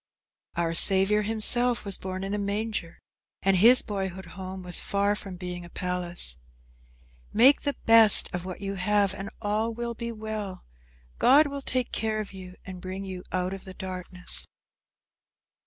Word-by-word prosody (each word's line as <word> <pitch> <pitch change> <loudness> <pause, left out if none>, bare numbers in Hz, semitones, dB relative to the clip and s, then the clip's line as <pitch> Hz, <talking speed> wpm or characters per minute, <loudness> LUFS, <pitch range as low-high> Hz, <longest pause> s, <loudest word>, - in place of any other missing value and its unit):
Our 170 -1 0
Saviour 195 +4 +4
himself 225 +2 +3
was 200 -2 -2
born 185 0 -6
in 195 +1 -3
a 210 - -1
manger, 205 -3 -3 0.5
and 195 0 +4
his 235 +7 +7
boyhood 190 -3 -4
home 185 0 -7
was 180 -1 -2
far 200 +1 0
from 195 -2 -7
being 180 -1 -6
a 175 - -11
palace. 180 - -3 0.9
Make 255 +6 +6
the 285 - -1
best 225 -2 +7
of 180 0 -3
what 185 +1 -7
you 195 0 -3
have 200 +1 +1
and 195 +1 -6
all 215 +2 0
will 235 0 -4
be 235 +1 -5
well. 215 -3 -6 0.5
God 280 +5 +6
will 280 -1 -5
take 255 -2 -2
care 220 -1 -1
of 210 -2 -6
you 185 -1 -10
and 185 -2 -8
bring 185 +2 -6
you 185 -1 -6
out 185 0 -1
of 195 - -8
the 190 -1 -10
darkness. 185 -1 -4
195 Hz, 165 wpm, -27 LUFS, 185-220 Hz, 0.9 s, his